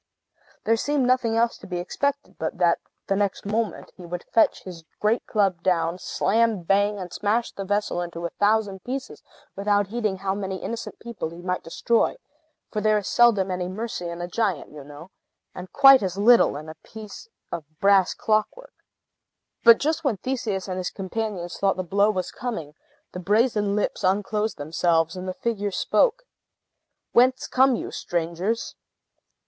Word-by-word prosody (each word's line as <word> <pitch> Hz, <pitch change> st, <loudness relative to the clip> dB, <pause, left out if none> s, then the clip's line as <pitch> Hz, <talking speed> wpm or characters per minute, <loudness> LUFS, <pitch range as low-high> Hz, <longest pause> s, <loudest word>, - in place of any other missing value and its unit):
There 225 Hz, +1 st, +2 dB
seemed 285 Hz, +2 st, 0 dB
nothing 245 Hz, -3 st, +2 dB
else 230 Hz, 0 st, +1 dB
to 195 Hz, -, -12 dB
be 180 Hz, -1 st, -3 dB
expected 280 Hz, +10 st, -2 dB
but 160 Hz, -, -3 dB
that, 175 Hz, -2 st, +3 dB, 0.3 s
the 195 Hz, -, 0 dB
next 200 Hz, 0 st, -1 dB
moment, 215 Hz, +1 st, -2 dB
he 180 Hz, -, -12 dB
would 175 Hz, 0 st, -6 dB
fetch 225 Hz, -, +3 dB
his 175 Hz, -3 st, -9 dB, 0.2 s
great 215 Hz, +3 st, +1 dB
club 195 Hz, -6 st, +1 dB
down, 170 Hz, -1 st, 0 dB
slam 220 Hz, -2 st, +1 dB
bang, 205 Hz, +3 st, +2 dB
and 180 Hz, -3 st, -7 dB
smash 220 Hz, +3 st, 0 dB
the 195 Hz, -, -6 dB
vessel 205 Hz, -2 st, -1 dB
into 170 Hz, -1 st, -5 dB
a 170 Hz, -, -3 dB
thousand 205 Hz, -2 st, +1 dB
pieces, 265 Hz, +2 st, -5 dB, 0.3 s
without 205 Hz, 0 st, +1 dB
heeding 215 Hz, -4 st, -1 dB
how 190 Hz, 0 st, -2 dB
many 195 Hz, -1 st, -4 dB
innocent 230 Hz, +5 st, -6 dB
people 235 Hz, -8 st, -6 dB
he 170 Hz, +2 st, -11 dB
might 180 Hz, 0 st, -2 dB
destroy; 230 Hz, -, 0 dB, 0.5 s
for 210 Hz, -, -2 dB
there 215 Hz, 0 st, +3 dB
is 205 Hz, -, -3 dB
seldom 210 Hz, -6 st, +4 dB
any 180 Hz, -1 st, -2 dB
mercy 190 Hz, -2 st, -4 dB
in 170 Hz, 0 st, -6 dB
a 175 Hz, -, -3 dB
giant, 195 Hz, -5 st, -1 dB
you 150 Hz, -1 st, -10 dB
know, 145 Hz, +6 st, -12 dB, 0.4 s
and 180 Hz, 0 st, -9 dB
quite 270 Hz, -2 st, +8 dB
as 190 Hz, -1 st, -3 dB
little 225 Hz, -7 st, +5 dB
in 155 Hz, +1 st, -9 dB
a 155 Hz, -, -7 dB
piece 220 Hz, -, -11 dB, 0.2 s
of 170 Hz, -2 st, -4 dB, 0.2 s
brass 195 Hz, -2 st, +4 dB
clockwork. 215 Hz, -, -1 dB, 0.9 s
But 230 Hz, -1 st, +9 dB
just 315 Hz, +2 st, -1 dB
when 260 Hz, -8 st, 0 dB
Theseus 215 Hz, -5 st, -3 dB
and 185 Hz, -1 st, -3 dB
his 180 Hz, -, -2 dB
companions 195 Hz, -2 st, -4 dB
thought 195 Hz, -1 st, +1 dB
the 185 Hz, -, -2 dB
blow 200 Hz, +4 st, +2 dB
was 185 Hz, -4 st, -2 dB
coming, 170 Hz, -12 st, -5 dB, 0.4 s
the 180 Hz, -, -6 dB
brazen 210 Hz, +1 st, +1 dB
lips 210 Hz, -, -1 dB
unclosed 210 Hz, +3 st, 0 dB
themselves, 165 Hz, +2 st, +1 dB
and 185 Hz, 0 st, -6 dB
the 185 Hz, -, -2 dB
figure 205 Hz, -3 st, -2 dB
spoke. 480 Hz, -, +1 dB, 0.9 s
"Whence 255 Hz, +2 st, +4 dB
come 260 Hz, 0 st, +3 dB
you, -, -, -5 dB
strangers?" 175 Hz, +6 st, -2 dB
200 Hz, 170 wpm, -24 LUFS, 180-225 Hz, 0.9 s, But